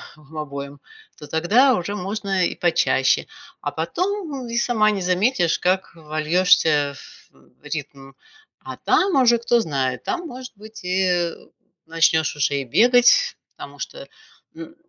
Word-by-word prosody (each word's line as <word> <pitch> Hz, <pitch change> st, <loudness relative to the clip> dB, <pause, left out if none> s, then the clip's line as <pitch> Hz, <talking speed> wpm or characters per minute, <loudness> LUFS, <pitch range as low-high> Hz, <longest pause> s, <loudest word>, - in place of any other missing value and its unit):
обоим, 145 Hz, -2 st, -8 dB, 0.4 s
то -, -, -10 dB
тогда 210 Hz, -, +3 dB
уже 200 Hz, 0 st, -3 dB
можно 195 Hz, -1 st, -2 dB
и -, -, -2 dB
почаще. -, -, +2 dB, 0.4 s
А -, -, -3 dB
потом 350 Hz, -8 st, -3 dB
и 235 Hz, 0 st, -3 dB
сама 220 Hz, -3 st, +2 dB
не 200 Hz, -2 st, -3 dB
заметишь, 180 Hz, 0 st, +1 dB
как 185 Hz, +1 st, 0 dB
вольёшься 155 Hz, -2 st, +2 dB
в, -, -, -17 dB
м, 65 Hz, 0 st, -24 dB
ритм, 145 Hz, -2 st, -7 dB, 0.5 s
а -, -, -9 dB
там 380 Hz, -3 st, +1 dB
уже, 235 Hz, -1 st, +4 dB
кто 235 Hz, +1 st, +2 dB
знает. 135 Hz, -, -2 dB
Там, 350 Hz, -1 st, -3 dB
может 255 Hz, -2 st, -9 dB
быть, 215 Hz, 0 st, -13 dB
и, 185 Hz, +1 st, 0 dB
э, 175 Hz, -2 st, 0 dB, 0.5 s
начнешь 160 Hz, -1 st, +2 dB
уже 145 Hz, -1 st, 0 dB
и 140 Hz, -, -1 dB
бегать, 245 Hz, -, +4 dB, 0.2 s
потому -, -, -11 dB
что, -, -, -7 dB, 0.5 s
м, 325 Hz, -1 st, -10 dB
185 Hz, 140 wpm, -22 LUFS, 155-240 Hz, 0.5 s, уже